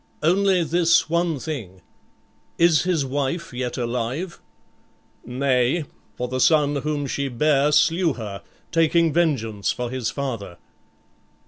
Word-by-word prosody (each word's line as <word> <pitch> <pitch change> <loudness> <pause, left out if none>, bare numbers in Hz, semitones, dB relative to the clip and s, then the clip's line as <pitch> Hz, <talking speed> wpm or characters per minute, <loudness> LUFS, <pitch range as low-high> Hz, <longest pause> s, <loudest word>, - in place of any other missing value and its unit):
"Only 185 +2 +3
this 170 -1 +2
one 170 -2 +1
thing. 110 - -6 0.7
Is 170 -1 +4
his 170 -6 +1
wife 140 +4 -3
yet 125 -1 -3
alive?" 125 +8 -3 0.8
"Nay; 130 +4 0 0.3
for 125 - -3
the 130 +1 -3
son 145 0 +3
whom 145 0 -2
she 140 +1 -2
bare 145 +3 +2
slew 165 +2 +3
her, 105 -5 -7 0.3
taking 165 -1 +3
vengeance 115 -12 0
for 125 -1 -4
his 130 -3 -2
father." 115 -9 -5
145 Hz, 120 wpm, -23 LUFS, 125-165 Hz, 0.8 s, Is